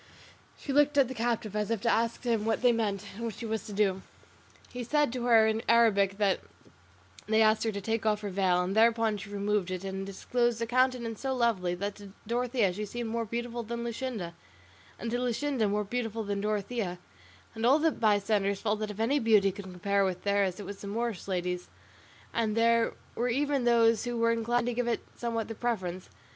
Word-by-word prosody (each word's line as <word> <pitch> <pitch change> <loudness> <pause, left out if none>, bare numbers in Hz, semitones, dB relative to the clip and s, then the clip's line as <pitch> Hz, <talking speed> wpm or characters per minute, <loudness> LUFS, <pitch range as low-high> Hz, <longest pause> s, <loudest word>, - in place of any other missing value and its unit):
She 275 - -4
looked 290 0 +4
at 275 -3 +5
the 260 - -5
captive 225 -3 -2
as 210 0 -1
if 230 -2 0
to 235 - -2
ask 230 +2 0
him 230 -3 +1
what 225 +2 -1
they 245 - +6
meant 210 -4 -1
and 225 +4 -8
what 225 - -4
she 235 - -7
was 220 -2 -3
to - - -7
do. 195 -2 +1 0.7
He 245 0 -4
said 295 +1 +1
to 245 -2 -3
her 225 -2 +6
in 220 0 +1
Arabic 200 -4 +4
that 200 -2 +2 0.9
they 220 0 +3
asked 215 0 +3
her 225 - +1
to 200 -1 -5
take 225 +2 -1
off 210 -1 +1
her 205 -2 -4
veil, 180 -2 +2
and 190 +2 -2
thereupon 225 -1 +3
she 200 +1 -9
removed 205 -2 -1
it 185 0 -4
and 195 0 -4
disclosed 240 +4 -1
a 230 - 0
countenance 245 -2 0
so 265 -1 -1
lovely, 205 -8 +1
that 200 +3 -3
to 200 -2 -12
Dorothea 235 -3 +1
she 210 +3 -4
seemed 230 +2 -4
more 230 0 -1
beautiful 240 +2 -4
than 235 +1 -5
Luscinda, 235 -7 -4 0.6
and 230 - -4
to 245 - 0
Luscinda 250 -2 0
more 210 +1 0
beautiful 225 0 -3
than 200 -1 -2
Dorothea, 210 -2 -2 0.6
and 225 0 -6
all 260 +5 +6
the 320 +1 +2
bystanders 205 -3 +1
felt 210 -1 -1
that 215 -1 -3
if 210 0 -8
any 260 +6 +2
beauty 215 -4 +4
could 200 +1 -9
compare 195 +2 0
with 185 -2 -2
theirs 200 -2 +1
it 205 - -6
was 200 +1 -8
the 200 - -7
Moorish 225 -1 -3
lady's, 180 -1 -2 0.6
and 225 -1 0
there 230 0 +3 0.2
were 245 +2 -1
even 280 +1 0
those 230 -1 +4
who 240 -1 -2
were 230 0 +3
inclined 230 +1 0
to 245 - -1
give 245 0 -1
it 235 - -1
somewhat 230 -2 -2
the 225 - -5
preference. 185 -6 -3
225 Hz, 210 wpm, -29 LUFS, 200-235 Hz, 0.9 s, they